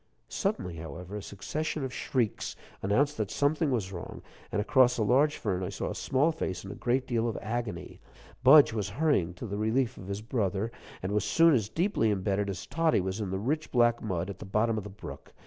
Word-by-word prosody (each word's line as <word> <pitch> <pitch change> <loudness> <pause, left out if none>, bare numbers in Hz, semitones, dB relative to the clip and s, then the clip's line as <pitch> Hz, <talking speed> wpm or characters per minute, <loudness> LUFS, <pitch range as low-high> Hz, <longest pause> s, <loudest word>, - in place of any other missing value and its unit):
Suddenly, 90 -2 -2
however, 85 +5 -7
a - - -5
succession 135 +11 -4
of 130 -2 -4
shrieks 120 -5 -1 0.3
announced 140 +10 +2
that 105 -3 -1
something 150 +2 +1
was 110 -8 -1
wrong, 85 -3 -7 0.3
and - - 0
across 125 +3 +4
a 110 - +2
large 140 +7 +3
fern 95 -4 -1
I 90 - -2
saw 100 - -3
a - - -3
small 145 +4 +1
face 100 - -4
in 95 - -6
a - - -5
great 130 +2 0
deal 120 -2 0
of 110 - -4
agony. 110 -5 -4 0.4
Budge 140 -1 +8
was 105 -3 -2
hurrying 140 - +2
to 90 - -7
the 100 -2 -4
relief 120 +3 +1
of 95 - -9
his 100 +2 -4
brother, 110 -2 -1 0.3
and 90 - -2
was 105 -1 +1
soon 165 +6 +5
as 110 -6 +1
deeply 165 - +1
imbedded 100 0 0
as 95 - -5
Toddie 160 -1 +2
was 95 +3 -2
in 100 - -2
the 95 - -2
rich 150 +10 -1
black 120 -1 +3
mud, 95 -2 -2
at 95 - -10
the - - -7
bottom 110 +4 +1
of 110 - -3
the 105 - -7
brook. 95 -1 -10
110 Hz, 215 wpm, -29 LUFS, 95-130 Hz, 0.4 s, Budge